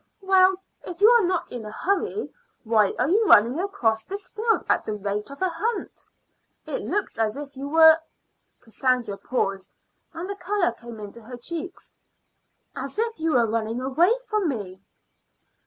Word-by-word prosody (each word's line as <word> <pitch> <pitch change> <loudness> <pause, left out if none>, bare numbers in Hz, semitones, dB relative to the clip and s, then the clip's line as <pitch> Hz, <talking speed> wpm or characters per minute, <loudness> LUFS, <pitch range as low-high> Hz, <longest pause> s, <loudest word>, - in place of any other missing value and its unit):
"Well, 380 0 +5 0.3
if 355 -1 -8
you 420 +2 +7
are 470 -6 +5
not 355 -2 -2
in 240 -2 -5
a 215 - -7
hurry, 395 - -2 0.3
why 220 -3 +3
are 250 - +1
you 405 +8 +3
running 235 +8 +6
across 240 - 0
this 395 - -7
field 445 +1 0
at - - +2
the 215 - -3
rate 205 +2 -3
of 280 +6 -6
a 375 - +2
hunt? 430 +8 -4 0.6
It - - -3
looks 410 - -2
as 220 +2 0
if 285 -1 -8
you 275 +2 -6
were 320 +1 +7 0.3
" - - -48
Cassandra 240 -3 -1
paused, 195 -6 -2 0.4
and 340 +3 -6
the 400 - -4
color 390 -4 0
came 235 -1 -11
into 210 +3 -9
her 245 +3 -9
cheeks 340 +8 -7 0.8
"as - - -5
if 455 -2 -1
you 320 0 0
were 240 -2 +4
running 225 +1 -2
away 275 +9 +2 0.2
from 425 -6 0
me." 195 -7 -5
285 Hz, 170 wpm, -24 LUFS, 225-380 Hz, 0.8 s, you